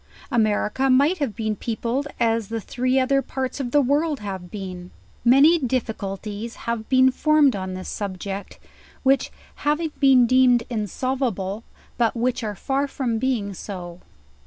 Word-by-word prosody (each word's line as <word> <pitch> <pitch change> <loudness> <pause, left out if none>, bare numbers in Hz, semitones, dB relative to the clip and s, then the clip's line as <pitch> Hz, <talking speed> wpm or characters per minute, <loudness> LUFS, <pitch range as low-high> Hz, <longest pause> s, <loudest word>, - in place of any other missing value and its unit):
America 225 +2 +1
might 285 +8 +4
have 270 -8 -2
been 220 -2 -2
peopled 235 +6 -2
as 225 -2 +1
the 230 +2 -3
three 255 +4 -1
other 275 +1 +2
parts 265 0 -4
of 260 -3 -2
the 290 +3 +3
world 290 +2 +1
have 190 -3 -6
been.. 185 -3 -7 0.3
Many 280 +8 +6
difficulties 220 -4 -3
have 235 -2 -3
been 260 0 +5
formed 300 -1 +3
on 185 -1 -4
this 185 - -6
subject, 200 0 -5 0.5
which, 270 0 +2 0.3
have 295 +1 0 0.2
been 265 -3 +6
deemed 250 -1 +4
insolvable, 220 -2 -2 0.4
but 230 0 +2
which 250 +1 -1
are 210 -2 -3
far 275 +6 -1
from 245 -5 -2
being. 230 -6 -1
so. 180 -3 -7
240 Hz, 145 wpm, -23 LUFS, 205-265 Hz, 0.5 s, Many